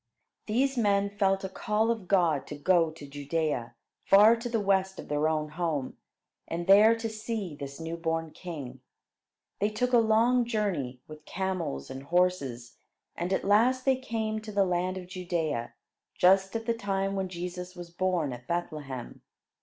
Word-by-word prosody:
These 260 +4 +1
men 200 -2 +2
felt 195 -1 +1
a - - -1
call 215 +3 0
of 220 -6 -4
God 170 -7 +2
to 150 - -6
go 165 +2 +3
to 155 -2 -11
Judea, 145 -4 -2 0.3
far 210 +4 +7
to 235 +1 -5
the 230 -1 0
west 190 -1 +1
of - - -9
their 150 +1 +1
own 155 -1 -1
home, 155 -4 -2 0.5
and 170 +1 -3
there 210 +4 +7
to 225 0 -3
see 220 -5 -4
this 140 0 -8
new 165 +1 -4
born 165 -1 -2
king. 140 -9 -8 0.8
They 205 - +2
took 250 +4 -1
a 240 - +7
long 230 +3 +4
journey, 190 - -2
with 155 0 -12
camels 185 - -3
and 135 - -6
horses, 140 -7 0 0.4
and 175 +2 -3
at 190 - 0
last 240 +6 +3
they 265 -1 +4
came 220 -4 -3
to, 215 0 -8
the 200 -1 +3
land 180 +1 -1
of 185 - -7
Judea, 170 -9 -3 0.4
just 190 +3 +4
at 225 0 -2
the 235 - +1
time 195 -3 -2
when 190 -1 -2
Jesus 180 +1 -6
was 175 -1 -9
born 175 -6 0
at 125 0 -10
Bethlehem. 150 -7 -4
185 Hz, 170 wpm, -29 LUFS, 155-215 Hz, 0.8 s, far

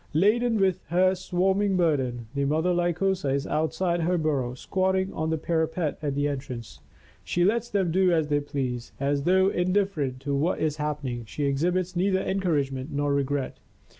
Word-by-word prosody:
Laden 225 +7 +3
with 190 -2 +2
her 185 +4 +3
swarming 190 +2 +1
burden, 130 -8 0
the 140 0 0
mother 160 +5 +1
Lycosa 175 0 0
is 140 - -2
outside 165 +3 0
her 175 +2 +1
burrow, 140 -6 -1
squatting 190 +6 0
on 160 0 -2
the 160 - 0
parapet 160 0 -1
at 145 -3 -2
the 145 +1 +1
entrance. 130 -5 -6 0.4
She 175 0 +1
lets 235 +4 +1
them 190 -4 0
do 185 +1 +3
as 160 -3 +2
they 145 0 +2
please, 130 -4 -4
as 140 +1 0
though 190 +1 +4
in 180 -1 0
different 155 -11 0
to 140 0 -2
what 150 +6 +1
is 155 -1 0
happening, 145 -6 -3
she 145 +7 -5
exhibits 175 +6 0
neither 190 +2 +2
encouragement 150 -8 -1
nor 145 0 0
regret. 140 -1 -1
160 Hz, 170 wpm, -26 LUFS, 140-185 Hz, 0.4 s, though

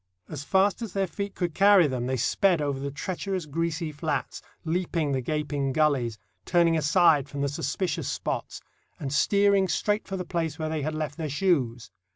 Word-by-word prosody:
As 145 -3 -6
fast 195 +7 +2
as 220 -6 -5
their 195 -1 +1
feet 200 +2 -5
could 175 -3 -2
carry 200 -1 +6
them 125 -3 -2
they 130 0 0
sped 180 - +2
over 140 -2 -1
the 140 +1 -3
treacherous 185 +4 -4
greasy 165 +1 -2
flats, 150 +1 -3 0.2
leaping 165 -2 -1
the 135 -1 0
gaping 145 0 -1
gullies, 135 -7 +1 0.3
turning 170 -1 +3
aside 155 -2 +4
from 140 +1 -5
the 140 - +1
suspicious 155 +4 -2
spots, - - -3 0.4
and 135 -1 -4
steering 200 +3 +3
straight 210 +5 0
for 195 - -3
the 180 - -4
place 165 -3 -2
where 155 -1 -3
they 155 -1 -2
had 155 +2 -2
left 155 -1 -3
their 160 -3 -3
shoes. 135 -8 0
160 Hz, 185 wpm, -27 LUFS, 145-185 Hz, 0.4 s, carry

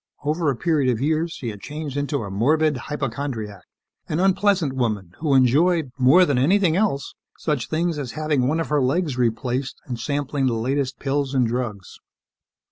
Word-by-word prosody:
Over 155 +2 0
a 135 - 0
period 145 -2 +1
of 115 - -2
years, 160 +4 0
she 125 -6 -5
had 105 -2 -8
changed 150 +1 -6
into 145 -2 -1
a 100 - -6
morbid 150 +9 +2
hypochondriac, 125 -6 -4 0.5
an 155 - -1
unpleasant 190 -5 +2
woman 110 -8 -2
who 150 -3 +1
enjoyed 145 +4 +3
more 140 +9 +6
than 140 -6 +1
anything 175 +4 +3
else 190 -9 0 0.2
such 145 -8 -2
things 165 0 0
as 130 -4 -5
having 150 -4 0
one 155 +4 +1
of 165 - -2
her 150 -1 +2
legs 145 +2 0
replaced 125 +2 -1
and 120 -3 -5
sampling 140 +1 -1
the 125 - +1
latest 130 +3 -1
pills 140 0 -1
and 130 -2 +3
drugs. 115 -5 -4
140 Hz, 175 wpm, -23 LUFS, 125-155 Hz, 0.5 s, more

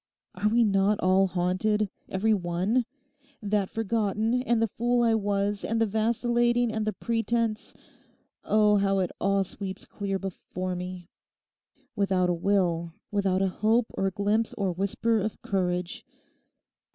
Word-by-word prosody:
Are 210 - 0
we 235 +2 +4
not 200 0 +2
all 190 +1 +3
haunted—every 190 +3 0
one? 190 +6 0 0.5
That 205 -2 0
forgotten, 225 +2 0
and 240 -2 +1
the 225 - +3
fool 240 +3 +1
I 230 -1 +3
was, 205 -1 0
and 225 +1 -1
the 225 - +4
vacillating, 240 +2 +1
and 220 -1 -2
the 215 - 0
pretence—oh, 220 -1 -1
how 195 0 +2
it 185 -2 0
all 195 0 +2
sweeps 190 +1 -6
clear 195 -1 -3
before 185 -1 -5
me; 180 -1 -6 0.9
without 190 -3 +1
a - - +2
will, 170 -2 0 0.2
without 195 -2 +1
a - - +3
hope 220 +5 +1
or 195 - 0
glimpse 205 +4 0
or 195 -3 -1
whisper 200 +5 0
of 215 +1 -3
courage. 180 -2 -2
200 Hz, 135 wpm, -27 LUFS, 190-225 Hz, 0.9 s, we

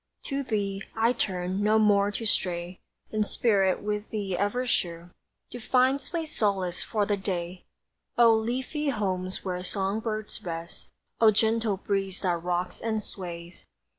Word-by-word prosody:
To 275 0 -2
thee, 200 -6 -1
I 230 +2 +3
turn, 185 -3 -1
no 215 +1 +4
more 205 -2 +4
to 215 +2 -3
stray 175 -3 0 0.3
In 215 -1 +2
spirit, 200 -4 +2
with 210 0 -2
thee 200 -4 -2
ever 205 +7 0
sure 175 -7 -1 0.4
To 245 - -6
find 260 +4 +3
sweet 330 +3 -3
solace 195 - 0
for 210 -3 0
the 205 - +1
day! 180 -2 -4 0.5
O 235 -1 +7
leafy 255 +7 -1
homes 190 -6 -2
where 180 -1 -2
song 195 +3 -1
birds 215 -1 -4
rest; 170 -1 -6 0.3
O 225 - +7
gentle 220 -1 +2
breeze 195 -1 -1
that 175 -3 0
rocks 180 +1 -2
and 220 -2 -1
sways! 175 -3 -8
205 Hz, 150 wpm, -28 LUFS, 185-225 Hz, 0.5 s, O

